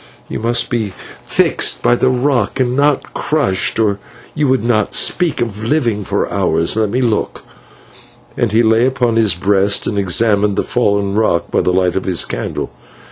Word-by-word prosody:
You - - -5
must 115 +2 0
be 110 -5 -2 0.3
fixed - - +1
by - - +4
the 125 +1 +2
rock 125 -3 0
and 125 -1 0
not 145 0 0
crushed, 115 -11 0
or 105 -3 +1 0.3
you 150 -2 0
would 130 -2 +1
not 110 -3 0
speak 175 -3 +1
of 110 -2 -4
living 115 -5 0
for 100 +1 -1
hours. 85 -3 0
Let 110 -2 0
me 125 +5 -1
look," 115 -4 -1 0.9
and 120 -3 -1
he 115 +2 +3
lay 110 +2 +3
upon 125 -3 0
his 110 -6 +2
breast 100 +2 +1
and 100 - -1
examined 100 +2 +1
the - - 0
fallen 100 -4 0
rock 105 -5 0
by - - +2
the - - 0
light 90 -1 +1
of 95 - 0
the 95 -3 0
candle. - - -4
110 Hz, 180 wpm, -16 LUFS, 100-120 Hz, 0.9 s, by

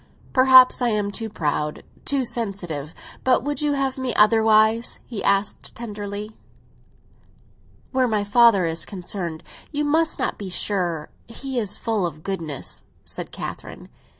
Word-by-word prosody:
"Perhaps 255 -1 +7
I 245 - +2
am 210 -2 0
too 225 +2 -4
proud—too 155 - -2
sensitive. 175 - -4 0.3
But 255 -2 +3
would 290 0 -2
you 295 -1 +1
have 270 -1 -1
me 255 -2 -2
otherwise?" 220 +1 +4
he 225 -5 -5
asked 200 +1 0
tenderly. 210 -2 -6 1.6
"Where 260 -1 +2
my 215 -3 0
father 205 -3 +5
is 165 0 -2
concerned, 175 -4 -4 0.3
you 295 -1 -1
must 320 +2 +2
not - - -2
be 200 -2 -5
sure. 175 -5 -1 0.2
He 260 +2 -4
is 210 -4 -2
full 215 -6 0
of 155 -1 -10
goodness," 165 -8 -4 0.2
said - - -7
Catherine. - - -8
215 Hz, 135 wpm, -23 LUFS, 190-250 Hz, 1.6 s, Perhaps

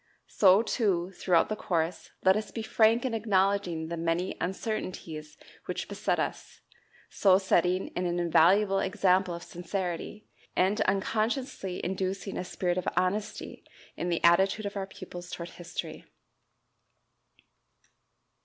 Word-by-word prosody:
So, 195 +2 +5
too, 190 -7 0
throughout 180 -2 +2
the 215 - -2
course, 170 -4 -2
let 190 0 +6
us 215 0 -2
be 225 - -5
frank 225 +2 +3
in 255 - -1
acknowledging 195 -6 +1
the 170 - -3
many 165 +2 -1
uncertainties 180 -6 -4 0.3
which - - -4
beset - - -1
us, - - -4 0.5
so 190 -2 +5
setting 185 -1 +1
an 180 0 0
invaluable 175 +3 +3
example 190 -2 +2
of 170 - -8
sincerity, 180 +3 -4 0.3
and 190 +3 +2
unconsciously 215 +1 -1
inducing 190 +1 -3
a - - -2
spirit 180 0 -1
of 180 - -6
honesty 185 +4 -2 0.3
in 175 - -3
the 170 - -1
attitude 190 +5 +4
of 200 - -4
our 195 -1 -3
pupils 180 -2 -9
toward 170 -1 -6
history. 170 -2 -7
185 Hz, 125 wpm, -29 LUFS, 175-200 Hz, 0.5 s, let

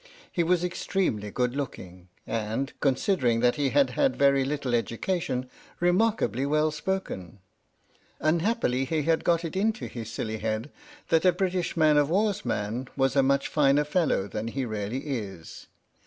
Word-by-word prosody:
He 175 - 0
was 175 +1 +2
extremely 175 - -1
good 125 +3 -1
looking, 90 -10 -6 0.2
and, 115 +5 -2
considering 130 - +2
that 120 0 +4
he 145 -2 0
had 280 -2 +3
had 275 -2 +1
very 140 -1 +4
little 135 -2 -2
education, 130 +3 -1 0.3
remarkably 175 - +2
well 150 +2 +2
spoken. 150 - -4 0.8
Unhappily 160 - +1
he 155 +2 -1
had 165 +1 +1
got 170 0 +2
it 165 - -5
into 220 +4 0
his 115 -2 -7
silly 110 -1 -4
head 110 +5 -3 0.4
that 165 - +3
a 185 - +6
British 180 -1 -1
man 155 -2 +5
of 145 0 +3
war's 205 +3 +1
man 115 +2 -2
was 135 0 +2
a 140 - +5
much 140 +1 +2
finer 145 -1 +3
fellow 150 - +1
than 105 +3 -4
he 130 +3 -2
really 110 +3 -3
is. 100 - -6
140 Hz, 155 wpm, -27 LUFS, 115-175 Hz, 0.8 s, a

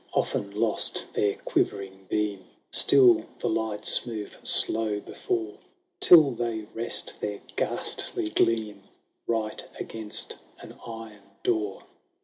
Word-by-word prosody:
Often 100 +1 -1
lost 115 -2 0
their 100 -1 +1
quivering 95 -1 -2
beam, 105 -3 -1 0.3
Still 365 -4 +6
the - - -2
lights 110 -10 0
move 110 -4 -6
slow 110 -2 +4
before, 370 - -4 0.4
Till 155 -6 +8
they 115 -2 -2
rest 115 +1 -1
their 105 -1 -3 0.2
ghastly 105 - -2
gleam 110 -2 +1 0.5
Eight 110 -2 -2
against 110 -2 -3 0.2
an - - -11
iron 115 -2 -9 0.2
door. 105 -4 -1
110 Hz, 110 wpm, -27 LUFS, 105-115 Hz, 0.5 s, Till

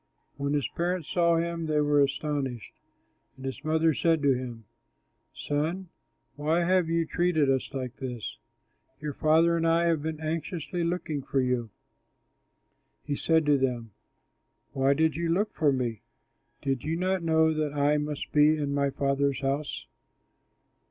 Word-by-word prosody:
When 140 +1 -2
his 145 -2 +1
parents 175 -1 -2
saw 170 -1 +3
him, 165 -1 -2
they 155 -1 +1
were 145 -1 +3
astonished; 140 -4 -2 0.6
and 135 0 -10
his 135 +2 -5
mother 160 +1 +2
said 165 +1 +1
to 140 -1 +5
him, 120 -3 -6 0.7
"Son, 165 +6 -2 0.5
why 155 +4 +1
have 180 -1 +2
you 165 0 +1
treated 160 -4 +2
us 130 -1 -1
like 130 -2 -5
this? 125 -4 -6 0.6
Your 150 -1 -4
father 160 +4 +3
and 165 0 +1
I 165 +1 +3
have 165 -3 +2
been 155 0 -4
anxiously 165 +2 -3
looking 165 -4 -2
for 135 +1 -1
you." 125 -3 0 1.3
He 145 - -2
said 160 +1 +2
to 145 -2 +4
them, 120 -4 -1 0.8
"Why 135 +1 +2
did 160 -1 +2
you 170 +1 -1
look 200 +6 +1
for 150 -3 +2
me? 120 -5 -2 0.6
Did 135 -3 -1
you 160 +2 -1
not 185 +1 0
know 160 -1 +3
that 155 -2 -1
I 145 +1 +3
must 150 -1 -4
be 150 +1 +5
in 145 -2 -2
my 140 0 +1
Father's 140 0 0
house?" 140 +2 -2
150 Hz, 155 wpm, -28 LUFS, 140-165 Hz, 1.3 s, to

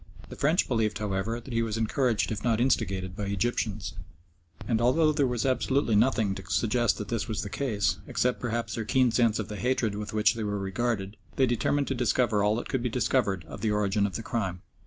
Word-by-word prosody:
The - - -8
French 155 +6 +2
believed, 110 -4 0
however, 105 +2 -2
that 120 +1 -9
he 115 - +2
was 115 -1 -2
encouraged 115 +1 +1
if 105 - -4
not 115 -2 +2
instigated 95 -7 0
by 105 - -3
Egyptians, 105 0 -1 0.7
and 115 -2 +1
although 155 +6 +4
there 145 -2 +2
was 120 -1 -1
absolutely 130 -2 +1
nothing 110 -2 +3
to 95 - -7
suggest 120 0 +1
that 105 - -6
this 115 -1 -2
was 110 -4 -2
the 100 - -6
case, 105 -2 0
except 125 0 0
perhaps 120 -1 -2
their 115 - -2
keen 125 +2 +3
sense 115 -2 +3
of 110 - -3
the 105 - -6
hatred 125 -3 0
with 105 0 -5
which 110 +2 +3
they 115 -2 -4
were 105 -1 -1
regarded, 100 +1 -2 0.2
they 135 - +4
determined 135 +4 +1
to - - +1
discover 120 -3 +1
all 105 +1 +3
that 120 - -4
could 130 - -1
be 125 - -1
discovered 110 -6 0
of - - -9
the 110 - +1
origin 105 -1 +1
of 95 - -8
the 115 - -4
crime. 95 -4 -3
115 Hz, 220 wpm, -28 LUFS, 105-125 Hz, 0.7 s, although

